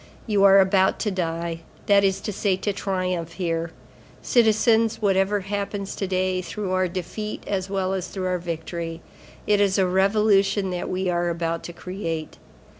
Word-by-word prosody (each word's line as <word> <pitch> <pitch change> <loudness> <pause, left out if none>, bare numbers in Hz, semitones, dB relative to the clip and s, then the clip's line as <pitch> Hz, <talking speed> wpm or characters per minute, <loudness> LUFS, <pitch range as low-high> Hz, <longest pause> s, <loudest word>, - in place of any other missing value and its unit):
You 205 -3 +2
are 195 0 +8
about 190 0 +3
to 210 - 0
die, 170 -2 -2 0.3
that 200 -1 +5
is 195 0 +1
to 210 - -4
say 195 -1 +1
to 205 +1 -2
triumph, 185 -4 -2
here. 165 -2 -2 0.5
Citizens, 225 -1 +3
whatever 195 0 +2
happens 200 0 -4
to 195 - -3
day, 185 0 0
through 195 +1 -4
our 185 0 +2
defeat 190 +4 -5
as 190 -1 -2
well 190 -1 -1
as 185 -1 -3
through 185 +1 -5
our 180 -1 0
victory, 165 0 -5 0.4
it 205 -1 +3
is 200 -1 +2
a 190 - +3
revolution 195 +1 +2
that 180 -1 -3
we 185 +1 -1
are 175 -1 +1
about 165 -1 -2
to 175 - -7
create. 165 -3 -5
190 Hz, 170 wpm, -24 LUFS, 175-200 Hz, 0.5 s, are